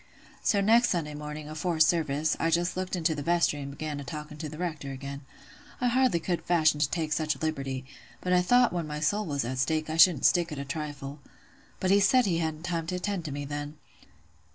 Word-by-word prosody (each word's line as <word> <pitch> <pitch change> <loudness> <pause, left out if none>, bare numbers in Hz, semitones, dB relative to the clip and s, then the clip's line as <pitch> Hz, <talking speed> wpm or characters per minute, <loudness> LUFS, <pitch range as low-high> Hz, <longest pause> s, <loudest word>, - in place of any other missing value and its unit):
So 200 -3 +2
next 230 +4 +5
Sunday 155 -4 -1
morning, 150 0 -7
afore 155 +2 -2
service, 155 -2 +2
I 165 - +1
just 175 +2 +1
looked 185 0 -2
into 165 -2 +1
the 145 - -4
vestry, 170 -1 +2
an' 140 - -6
began 145 +1 -5
a - - -6
talking 150 +3 -7
to 155 - -4
th' 155 - -9
Rector 155 -5 -4
again. 140 +1 -7 0.6
I 250 - +2
hardly 250 -7 +3
could 170 0 -2
fashion 160 -4 +3
to 145 -2 +2
take 160 -2 -1
such 155 -2 0
a - - -12
liberty, 135 -4 -3 0.3
but 180 +5 -1
I 180 - +5
thought 245 +5 +4
when 170 -3 -2
my 150 0 -4
soul 205 +7 0
was 140 -4 -1
at 130 +2 -3
stake 155 +3 0
I 160 - -2
shouldn't 170 -3 +6
stick 175 -2 +3
at 150 - -5
a 140 - -4
trifle. 145 -1 -5 0.6
But 185 - +1
he 200 - +6
said 245 +6 +4
he 170 -4 +1
hadn't 160 -1 -3
time 170 -2 -2
to 180 - -2
attend 180 -1 -3
to 150 - -4
me 145 +1 -4
then. 145 +1 -5
155 Hz, 225 wpm, -28 LUFS, 145-175 Hz, 0.6 s, shouldn't